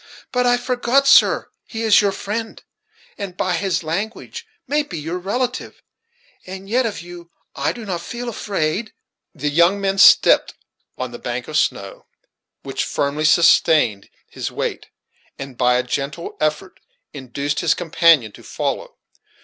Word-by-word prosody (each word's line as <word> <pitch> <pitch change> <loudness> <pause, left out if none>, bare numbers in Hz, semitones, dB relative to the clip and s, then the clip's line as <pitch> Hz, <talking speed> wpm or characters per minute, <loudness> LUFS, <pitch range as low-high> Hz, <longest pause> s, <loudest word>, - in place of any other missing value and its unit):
But 250 -1 +1
I 245 0 +4
forgot, 250 +2 +1
sir; 275 - +5 0.2
he 225 0 -5
is 220 -2 +5
your 200 -1 +1
friend, 215 +3 -5 0.6
and 190 -3 -6
by 185 -1 0
his 190 0 -1
language 215 - -5 0.2
may 295 +1 +1
be 195 - -7
your 165 +4 -4
relative; 245 +7 -3 0.6
and 190 +1 -9
yet 240 +3 +1
of 200 -5 -6
you 175 -1 -11 0.3
I - - 0
do 235 -2 -9
not 180 -4 -3
feel 240 +5 -6
afraid." 205 -2 -2 0.4
The 150 0 -2
young 170 +6 +3
man 195 0 -1
stepped - - +6 0.4
on - - -4
the - - -9
bank - - -4
of - - -7
snow, - - -1 0.6
which - - -3
firmly 145 +2 -1
sustained 155 - +4 0.2
his - - -6
weight, - - -4 0.5
and 135 -1 -8
by 125 0 +2
a 125 - +1
gentle 140 +6 -4
effort 155 +5 -2 0.3
induced 140 +1 -3
his 170 -3 +2
companion 165 - +3
to - - -15
follow. - - -4
185 Hz, 150 wpm, -20 LUFS, 155-225 Hz, 0.6 s, stepped